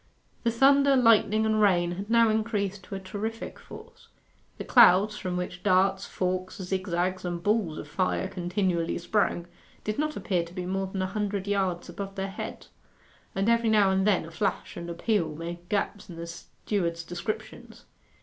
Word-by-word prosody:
The 235 - +1
thunder, 275 +3 +5
lightning, 220 -3 +4
and 220 0 +2
rain 175 -4 +3
had 195 +4 -6
now 230 0 +5
increased 210 -3 -1
to 195 - -7
a - - -4
terrific 210 +4 -5
force. - - -13 0.5
The - - -5
clouds, 210 -3 +6
from 180 -2 -3
which 180 0 -4
darts, 190 +2 +2
forks, 185 +2 -2
zigzags, 185 -1 -1
and 175 -1 -4
balls 205 -7 +1
of - - -7
fire 185 +4 0
continually 180 -2 -1
sprang, 175 -1 0 0.4
did 215 +3 -3
not 305 0 -1
appear 180 -4 0
to 170 +1 -12
be 180 -2 -4
more 190 +1 -1
than 190 0 -3
a - - 0
hundred 200 0 -2
yards 190 -4 -1
above 195 -1 -6
their 195 0 -3
heads, - - -7 0.7
and 195 +2 0
every 235 -1 +3
now 210 -3 +4
and 190 +1 +2
then 190 -6 +2
a 165 - -10
flash 195 +2 -2
and 170 0 -6
a 170 - -4
peal 170 -5 0
made 170 +2 -7
gaps 205 -1 -2
in 175 - -8
the 165 0 -6
steward's 170 0 -3
descriptions. 175 +6 -6
190 Hz, 180 wpm, -27 LUFS, 180-210 Hz, 0.7 s, clouds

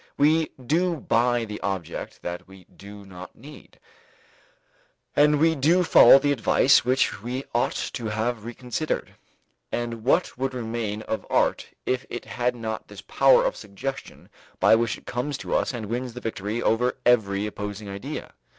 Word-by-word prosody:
We 155 +2 +3
do 165 +7 +1
buy 120 -4 +1
the 105 -1 -7
object 95 -4 -5
that 85 +1 -6
we 95 -1 -15
do 100 +2 -13
not 95 -1 -11
need, 145 +6 -14 1.4
and 150 0 +4
we 160 +1 +4
do 160 +5 +3
follow 135 -6 +8
the 145 +1 +1
advice 135 +1 +4
which 125 -5 +1
we 125 +4 -4
ought 120 - +1 0.2
to 115 -3 -4
have 110 +1 -2
reconsidered. 125 +5 -4 0.6
And 115 -2 -3
what 135 +2 +1
would 135 0 -2
remain 110 -3 -3
of 110 - -4
art - - +1 0.2
if 130 0 -1
it 120 - -6
had 125 0 -1
not 110 -2 -5
this 100 -1 -11
power 135 +6 +4
of - - 0
suggestion 110 +7 -7 0.3
by - - +5
which 115 0 +2
it - - -19
comes 130 +3 -3
to - - -5
us - - +1
and 120 -4 -5
wins 120 +3 -4
the - - -5
victory 110 0 -4
over 125 +3 +1
every 105 -5 +3
opposing 105 0 -6
idea? 100 0 -6
120 Hz, 160 wpm, -25 LUFS, 105-130 Hz, 1.4 s, follow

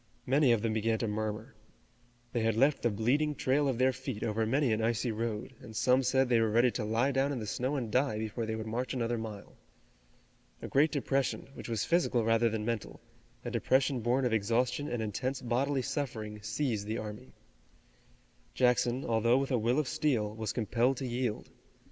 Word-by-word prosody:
Many 135 0 +4
of 115 -2 +2
them 115 -1 0
began 110 +1 +1
to 115 - -2
murmur. 110 +3 -3 0.8
They 120 - +1
had 110 -1 +1
left 135 +5 +3
the 120 - +2
bleeding 135 +8 +1
trail 140 +2 +1
of 130 -3 0
their 130 +1 +3
feet 130 -4 -5
over 110 0 0
many 135 0 +2
an 110 - 0
icy 115 +1 0
road, 110 +2 -3
and 110 - -11
some 125 +4 +3
said 130 +1 +2
they 120 -2 +3
were 110 - +2
ready 120 +3 +4
to 115 - -3
lie 115 +6 +1
down 135 +1 +1
in 140 - -2
the 110 - -4
snow 130 +7 -2
and 120 -6 -3
die 130 -2 +1
before 110 +1 -3
they 110 - -2
would 110 0 -5
march 120 +4 -3
another 120 -1 -1
mile. 110 -3 -7 1.1
A - - -6
great 150 +3 +3
depression, 135 -2 -1
which - - -9
was 115 -3 -1
physical 165 -9 +2
rather 115 +1 +3
than 110 -1 -3
mental, 115 -2 -3 0.5
a - - -3
depression 130 0 +2
born 125 +3 +1
of 120 - +1
exhaustion 120 +6 +1
and 120 -2 -2
intense 125 +5 -2
bodily 130 +2 0
suffering, 115 -7 -4
seized 110 -1 -2
the 110 +1 -2
army. 110 +3 -8 1.2
Jackson, 125 +1 +2
although 115 +2 +3
with 135 0 -1
a 125 - +2
will 120 +4 +1
of 155 -3 +1
steel, 135 -9 0
was 110 -1 -3
compelled 120 +3 +1
to 135 - -4
yield. 120 -2 -3
120 Hz, 195 wpm, -31 LUFS, 110-130 Hz, 1.2 s, Many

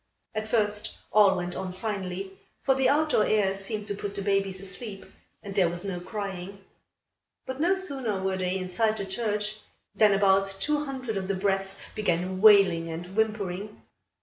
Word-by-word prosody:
At 215 0 -3
first, 210 -2 0 0.2
all 200 -3 +6
went 180 0 -3
on 185 -1 -4
finely, 190 -1 -4 0.3
for 270 - +4
the 265 -1 +2
outdoor 300 -6 +3
air 205 -3 +2
seemed 205 +2 -4
to - - 0
put 200 0 -5
the 200 - -3
babies 195 -1 0
asleep 195 +1 -5 0.4
and 200 - -6
there 190 -4 +3
was 175 +3 -4
no 185 -3 -3
crying. 195 0 -6 0.8
But 260 +2 -5
no 355 +4 +4
sooner 270 - -1
were 190 0 -1
they 185 0 -1
inside 215 +4 0
the 200 - -3
church, 210 +1 -1 0.4
than 210 -2 +5
about 195 0 +3
two 300 0 0
hundred 255 -6 -4
of 190 -1 -3
the 195 - 0
brats 195 0 -1
began 185 -2 -1
wailing 195 -6 +6
and 175 +3 -7
whimpering. 210 -2 -1
200 Hz, 170 wpm, -27 LUFS, 190-215 Hz, 0.8 s, all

